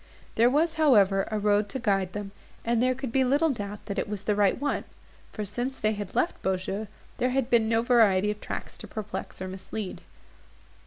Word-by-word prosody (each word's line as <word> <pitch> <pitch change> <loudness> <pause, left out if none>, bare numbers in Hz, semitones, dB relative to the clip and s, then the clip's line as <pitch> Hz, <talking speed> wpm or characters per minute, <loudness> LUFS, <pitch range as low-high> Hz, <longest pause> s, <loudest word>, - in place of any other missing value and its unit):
There 235 +2 +5
was, 315 +5 +2
however, 200 -9 +5
a 215 - -1
road 205 0 +2
to 265 - -3
guide 195 -6 0
them; 205 -1 -5 0.3
and 235 0 +2
there 255 +1 +2
could 265 -2 -5
be 265 +2 +3
little 290 +5 +3
doubt 205 -4 -6
that 200 -1 -3
it - - -2
was 205 -2 -4
the 210 - +1
right 205 +1 +2
one; 285 +1 -1 0.5
for, 210 - -4
since 245 +6 -3
they 215 - +1
had 205 -2 -6
left - - 0
Beaujeu, 190 +3 -2 0.3
there 250 - +2
had 260 -1 0
been 225 -2 +4
no 225 0 +2
variety 210 -5 +4
of 210 - -7
tracks - - -6
to - - -8
perplex 210 -3 -6
or - - -4
mislead. 190 +1 -6
215 Hz, 205 wpm, -27 LUFS, 200-250 Hz, 0.5 s, There